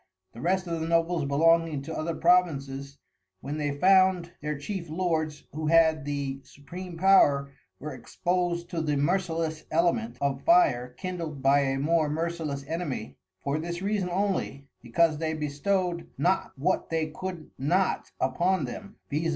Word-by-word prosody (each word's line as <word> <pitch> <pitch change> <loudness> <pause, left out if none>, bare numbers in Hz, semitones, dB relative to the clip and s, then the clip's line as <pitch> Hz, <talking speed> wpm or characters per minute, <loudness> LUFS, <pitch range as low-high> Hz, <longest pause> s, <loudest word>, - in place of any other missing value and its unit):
The 115 - -10
rest 185 +3 +1
of 165 -2 -3
the 160 - -2
Nobles 165 -1 +1
belonging 160 0 +3
to 160 - -6
other 160 +1 -2
Provinces, 140 -6 +1 0.4
when 145 +7 -5
they 145 -1 -2
found 185 0 +4
their 150 0 -3
Chief 170 +3 -5
Lords, 155 -3 -1
who 155 +1 -3
had 160 -2 +4
the 140 -2 -3
Supreme 175 +5 -9
Power 145 -7 +4 0.3
were 150 -1 -6
expos'd 175 +6 -1
to 165 - -1
the 150 -2 0
Merciless 165 0 -1
Element 175 +8 +1
of 140 -1 -1
Fire 225 - +3
kindled 165 -6 -5
by 140 +1 +5
a 135 -1 0
more 155 +2 +2
merciless 155 -3 -3
Enemy; 155 -7 -4 0.3
for 140 +2 -1
this 170 +2 -4
Reason 200 -2 0
only, 185 -7 -1 0.2
becauase 155 +6 +2
they 160 -1 -1
bestow'd 170 +4 -1
not 185 +2 +1
what 180 +8 0
they 160 -1 0
could 180 -1 -6
not 175 +8 +1
upon 170 +5 +1
them, 200 - -8 0.2
_viz. 155 +3 0
165 Hz, 150 wpm, -27 LUFS, 145-180 Hz, 0.4 s, by